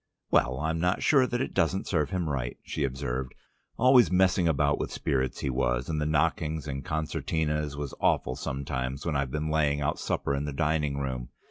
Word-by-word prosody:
"Well, 65 +1 +3
I'm 80 +2 -1
not 90 +2 +1
sure 135 -4 +5
that 120 +1 -1
it - - -3
doesn't 95 +4 +1
serve 75 -5 0
him 90 -4 -1
right," 65 -5 -2
she 75 - -3
observed. 65 -1 -3 0.4
"Always 125 0 +6
messing 90 -1 +3
about 70 -2 +2
with - - -3
spirits 65 -2 -1
he - - -1
was, 60 0 0
and 75 -2 -1
the 75 - 0
knockings 80 0 0
and 70 -1 -4
concertinas 75 -1 -1
was 70 -2 -4
awful 65 - +2
sometimes 65 -1 -3
when 80 -3 -1
I've 70 -2 0
been 75 +3 -2
laying 75 -2 +2
out 70 - -1
supper 70 - -1
in 70 +1 -1
the 75 - -4
dining 75 -1 0
room. 65 -3 -3
75 Hz, 195 wpm, -28 LUFS, 70-80 Hz, 0.4 s, Always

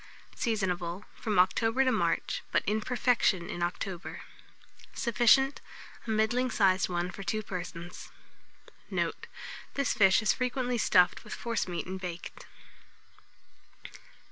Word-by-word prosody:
Seasonable 190 -4 -2
from 215 -4 -2
October 225 +7 +3
to 255 - +3
March, - - 0
but - - +2
in 215 +1 0
perfection 230 -7 +1
in 175 - -5
October. 175 +1 -4 0.7
Sufficient, 245 +3 +3 0.5
a - - -5
middling 220 +4 +1
sized 190 -5 +2
one 175 0 -1
for 200 - -9
2 215 +3 -2
persons. 175 -3 -7 0.8
Note. - - -2 0.5
This 280 -1 +1
fish 195 +1 +5
is 215 - +4
frequently 250 -1 -1
stuffed 180 -4 +4
with - - -7
forcemeat 205 -7 -2
and 190 +1 -5
baked. 175 -2 -7
210 Hz, 115 wpm, -30 LUFS, 180-240 Hz, 0.8 s, fish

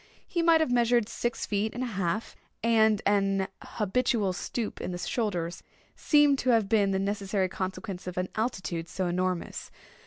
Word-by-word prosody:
He 340 - -1
might 330 -1 +5
have 315 - +1
measured 240 -2 +3
six 240 +1 -2
feet 210 +2 -1
and 250 - -2
a 240 -3 -4
half, 195 +3 -2 0.3
and 220 -2 +4
an 195 -1 +2
habitual 210 -2 0
stoop 220 +4 -4
in - - -3
the 175 - -4
shoulders 175 -3 -2 0.3
seemed 295 -2 +4
to 255 - 0
have 225 -4 +4
been 205 -1 +3
the 195 - +1
necessary 195 -1 0
consequence 185 0 -5
of 180 - -5
an 180 0 -1
altitude 185 -7 -2
so 190 - -2
enormous. 180 0 -2
205 Hz, 165 wpm, -28 LUFS, 185-235 Hz, 0.3 s, might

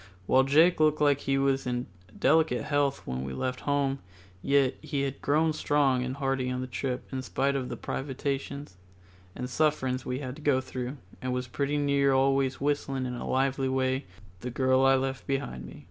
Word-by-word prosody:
While 130 +6 +4
Jake 160 +6 +5
looked 155 -1 +3
like 145 -2 +4
he 135 -1 0
was 135 -1 +1
in 125 0 -1 0.3
delicate 155 -6 +3
health 145 -2 0
when 65 +1 -3
we 65 0 -5
left 125 - -2
home, 140 -1 +1 0.4
yet 140 +1 +3
he 140 -1 -2
had 135 -1 -4
grown 155 +2 +2
strong 145 -4 +2
and 130 +1 -3
hearty 135 -2 -1
on 125 0 -2
the 130 - -3
trip 130 0 -3
in 130 -1 -3
spite 135 +2 0
of 130 -2 -2
the - - -5
privations 140 -3 -4 0.6
and 125 - -4
sufferings 130 -2 0
we 125 - -3
had 130 -2 -5
to - - -11
go 145 -3 +3
through, 130 +1 -5 0.2
and 130 0 -2
was 125 0 -2
pretty 140 +3 -1
near 140 -1 +3
always 135 0 +2
whistling 140 -2 -1
in 125 - -3
a 120 - -5
lively 135 0 +1
way 130 +1 0 0.3
"The 125 - -5
Girl 130 +1 +2
I 135 - +6
Left 130 -3 -2
Behind 135 - -3
Me." - - -11
135 Hz, 190 wpm, -28 LUFS, 130-140 Hz, 0.6 s, I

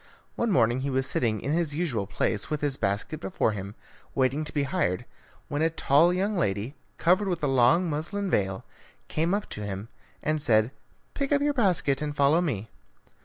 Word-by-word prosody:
One 235 - 0
morning 120 - +3
he 140 - -2
was 130 0 0
sitting 110 -5 0
in 140 - -2
his 160 -3 0
usual 135 - -1
place 100 +1 -1
with 150 -1 -2
his 145 -2 +3
basket 105 +9 -2
before 175 -9 0
him, 100 0 -6 0.4
waiting 135 +3 +1
to - - -6
be 145 - 0
hired, 90 -9 -1 0.4
when 145 +1 -2
a 165 - +3
tall 165 +1 +4
young 195 +4 0
lady, 105 - -1 0.2
covered 185 +4 +3
with 175 -4 -2
a - - +3
long 135 +7 +4
muslin 170 +7 -2
veil, 95 - 0 0.4
came 165 +5 +1
up 210 - -3
to 105 - -5
him 100 +1 -5 0.3
and 155 0 0
said, 110 -3 +3 0.4
"Pick 280 0 -2
up 285 -1 +3
your 290 0 +2
basket 180 - +2
and 150 -1 -3
follow 145 +4 +4
me." 115 - -2
145 Hz, 190 wpm, -27 LUFS, 115-175 Hz, 0.4 s, tall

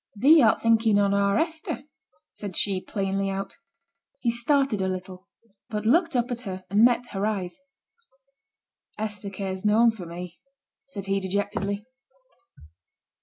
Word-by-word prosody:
'Thee 290 +9 +6
art 220 -3 +4
thinking 225 -2 +4
on 200 -1 +3
our 200 0 +2
Hester,' 320 -1 -2 0.5
said 200 -4 -7
she, 195 -3 +1
plainly 195 0 -2
out. 195 0 -5 0.6
He 240 -4 +1
started 240 -2 +1
a 190 - 0
little, 185 0 -6 0.4
but 210 -1 -3
looked 330 +6 +3
up 245 0 +1
at 240 0 -3
her 190 -5 -6
and 205 +2 +4
met 245 0 +3
her 195 0 -3
eyes. 195 -3 -2 1.4
'Hester 210 -1 -4
cares 190 -1 -5
noane 225 +3 +5
for 195 -6 -9
me,' 175 +1 -8 0.5
said 200 -8 -7
he, 195 0 0
dejectedly. 200 +1 -2
205 Hz, 140 wpm, -26 LUFS, 195-230 Hz, 1.4 s, Thee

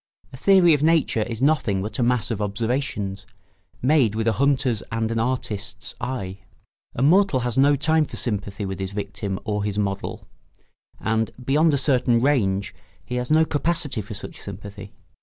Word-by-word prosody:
A - - -8
theory 185 +1 +5
of 145 - +1
nature 155 -7 +2
is 115 +2 -3
nothing 135 -10 +2
but 105 +2 -5
a - - +2
mass 120 -1 +1
of 110 -2 -2
observations, 105 -2 -2 0.6
made 130 -6 +3
with 110 0 -1
a - - +5
hunter's 130 -1 +1
and 115 -1 -1
an 115 - 0
artist's 110 -4 -3
eye. 115 -7 -4 0.6
A 125 - 0
mortal 175 -2 +4
has 120 -1 -1
no 140 +2 +5
time 155 +2 +2
for - - -8
sympathy 100 -2 -3
with 95 -1 -5
his 95 0 -4
victim 100 -1 -4
or 105 -2 -2
his 105 -1 -2
model; 100 -2 -3 0.7
and, 110 0 0 0.2
beyond 155 +5 +4
a - - +2
certain 125 -3 +2
range, 105 -8 +1 0.3
he 125 - -3
has 125 0 -2
no 160 +1 +5
capacity 155 -5 -1
for 105 +1 -8
such 100 - -8
sympathy. 100 +1 -9
115 Hz, 175 wpm, -23 LUFS, 105-140 Hz, 0.7 s, theory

